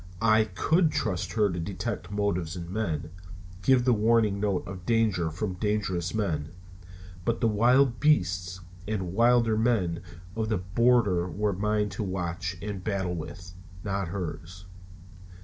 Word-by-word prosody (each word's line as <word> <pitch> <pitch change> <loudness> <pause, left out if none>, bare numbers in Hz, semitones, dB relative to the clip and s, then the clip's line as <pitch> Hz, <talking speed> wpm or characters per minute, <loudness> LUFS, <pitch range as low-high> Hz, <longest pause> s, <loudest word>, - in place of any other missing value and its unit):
I 110 0 +4
could 155 - +2
trust 95 -5 -2
her 110 -2 +3
to 90 - -3
detect 90 0 -4
motives 100 -5 -1
in 85 0 -6
men, 80 -8 -2 0.5
give 125 +5 +4
the 125 - +5
warning 110 -2 +3
note 100 -3 0
of 95 -2 -7
danger 105 -6 +1
from 90 +5 -3
dangerous 95 -3 -1
men; 85 -9 -1 0.7
but 115 +4 0
the 115 - +2
wild 120 +3 +3
beasts 90 - +1 0.3
and 95 -5 -2
wilder 115 0 +4
men 110 -7 +1 0.3
of 110 -1 -1
the 110 - +1
border 95 -1 +2
were 105 +2 -1
mine 105 +2 0
to 95 +3 -5
watch 90 -1 -3
and 100 -3 -5
battle 95 -4 -1
with, 90 +2 -7 0.3
not 100 -2 -2
hers. 90 0 -6
100 Hz, 145 wpm, -27 LUFS, 90-110 Hz, 0.7 s, the